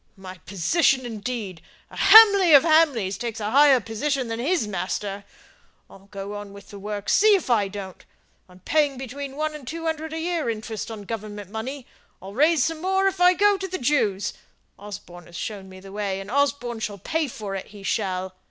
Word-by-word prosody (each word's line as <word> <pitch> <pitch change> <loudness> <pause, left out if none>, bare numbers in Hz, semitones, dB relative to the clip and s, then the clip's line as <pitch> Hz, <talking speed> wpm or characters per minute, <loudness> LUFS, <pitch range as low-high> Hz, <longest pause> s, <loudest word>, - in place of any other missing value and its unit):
My 185 -1 -10
position, 255 - +2
indeed! 215 -5 -5 0.3
A - - -12
Hamley 400 -5 +8
of 275 - +7
Hamley 310 - +3
takes 225 +3 -5
a 210 0 -3
higher 280 0 +6
position 245 +4 -2
than 225 0 -4
his 300 - 0
master. 195 +1 -4 0.7
I'll 195 0 -16
go 195 0 -7
on 205 -1 -8
with 200 0 -14
the 200 - -9
works, 205 0 -3
see 425 0 +6
if 360 -9 -2
I 210 -4 +3
don't! 195 -2 -8 0.5
I'm 180 0 -18
paying 290 - +1
between 270 +2 -7
one 310 +1 -2
and 290 -5 -10
two 330 +4 -5
hundred 320 -1 -3
a - - -3
year 335 -5 -2
interest 220 0 -5
on 220 -2 -7
Government 205 -2 -7
money. 250 +5 -6 0.3
I'll 195 +2 -10
raise 300 +3 +3
some 320 -1 -3
more 385 +1 +1
if 385 -2 0
I 360 0 +7
go 405 +2 +3
to 385 0 -5
the 370 0 -4
Jews; 215 -8 0 0.5
Osborne 175 -4 -10
has 170 - -10
shown 200 -3 -6
me 185 0 -12
the 195 +1 -12
way, 200 -2 -3
and 195 +2 -8
Osborne 275 -4 0
shall 205 -2 -4
pay 315 - -2
for 210 -5 -7
it 195 - -5
he 205 -1 -13
shall. 190 -2 -2
225 Hz, 200 wpm, -24 LUFS, 200-300 Hz, 0.7 s, Hamley